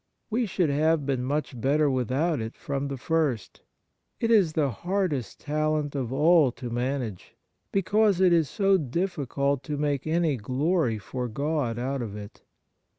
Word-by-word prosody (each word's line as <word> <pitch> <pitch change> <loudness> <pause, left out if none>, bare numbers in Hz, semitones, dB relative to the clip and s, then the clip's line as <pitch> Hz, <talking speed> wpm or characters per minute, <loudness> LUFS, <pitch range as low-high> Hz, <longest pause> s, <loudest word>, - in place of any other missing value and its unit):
We 235 +1 +1
should 185 -6 +1
have 155 +1 +2
been 135 -3 -1
much 135 -2 -2
better 145 +4 +3
without 135 +4 0
it 110 +1 -5
from 140 0 -3
the 140 -1 -4
first. 145 - -1 0.6
It 230 -1 +1
is 195 -8 +4
the 145 -4 +1
hardest 170 - -2
talent 155 0 -1
of 130 -4 -3
all 150 0 +4
to 120 -2 -7
manage, 120 -5 -3 0.4
because 200 0 +2
it 185 -2 +5
is 160 -5 +3
so 195 0 +3
difficult 140 -3 -1
to 150 0 -3
make 145 -1 -1
any 160 -3 +1
glory 130 - 0
for 125 +4 -4
God 140 -1 -1
out 130 +2 -2
of 105 -4 -5
it. 105 +1 -10
145 Hz, 155 wpm, -26 LUFS, 130-165 Hz, 0.6 s, it